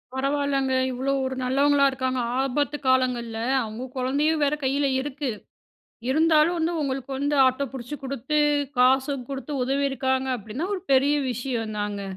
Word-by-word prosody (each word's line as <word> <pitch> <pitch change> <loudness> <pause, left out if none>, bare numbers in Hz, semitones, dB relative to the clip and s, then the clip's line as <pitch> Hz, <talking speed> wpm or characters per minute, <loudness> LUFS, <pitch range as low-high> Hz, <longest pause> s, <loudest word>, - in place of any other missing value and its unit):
பரவால்லங்க! 275 0 0 0.2
இவ்ளோ 260 +2 -2
ஒரு 260 0 -3
நல்லவங்களா 280 +2 +3
இருக்காங்க. 260 -1 -2 0.2
ஆபத்து 285 +2 0
காலங்கள்ல, 250 -3 +1 0.2
அவுங்க 220 +2 -5
கொழந்தையும் 290 +5 +1
வேற 285 +1 +2
கையில 280 +2 +1
இருக்கு. 280 0 -4 0.8
இருந்தாலும் 315 +3 +4
வந்து, 330 +1 0
உங்களுக்கு 270 -1 -3
வந்து 285 +1 0
ஆட்டோ 260 +2 +1
புடிச்சு 260 +3 -6
குடுத்து, 275 +3 -1 0.4
காசும் 260 +1 +3
குடுத்து 275 +2 -5
உதவியிருக்காங்க 265 -1 0
அப்டின்னா, 225 - -5
ஒரு 370 - -5
பெரிய 275 +2 +4 0.2
விஷயம் 235 -3 -3
தாங்க. 205 -1 -3
270 Hz, 135 wpm, -25 LUFS, 255-285 Hz, 0.8 s, இருந்தாலும்